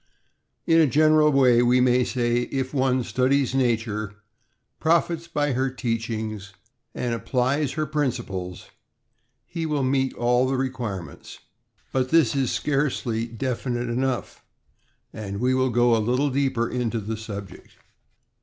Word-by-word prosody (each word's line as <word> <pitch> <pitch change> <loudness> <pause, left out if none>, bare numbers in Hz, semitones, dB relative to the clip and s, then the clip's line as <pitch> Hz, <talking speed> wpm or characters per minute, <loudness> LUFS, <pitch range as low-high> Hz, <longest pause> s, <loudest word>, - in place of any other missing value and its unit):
In 165 -1 +4
a 155 - +5
general 155 +2 +4
way, 125 -4 +5
we 125 +1 +4
may 125 0 +3
say 120 -1 0
if 130 0 -3
one 130 -2 +1
studies 130 +3 +1
nature, 110 -5 -1 0.6
profits 170 0 +1
by 145 -3 0
her 130 +2 0
teachings, 110 -4 -4 0.4
and 120 -1 -2
applies 125 +5 0
her 155 -1 -1
principles, 110 -11 -3 0.7
he 165 -2 -4
will 150 -3 0
meet 130 0 0
all 125 +2 +2
the 135 - 0
require 125 -8 -3
ments. 75 - -12 0.5
But 130 -1 0
this 160 -4 +3
is 135 -3 +1
scarcely 130 -5 -1
definite 120 0 -3
enough, 125 +1 -2 0.7
and 100 -2 -6
we 125 +2 +2
will 130 0 +2
go 120 0 +3
a 110 - +1
little 125 +6 +1
deeper 130 -3 0
into 120 -2 -2
the 110 +2 -4
subject. 100 -3 -9
125 Hz, 135 wpm, -24 LUFS, 115-135 Hz, 0.7 s, a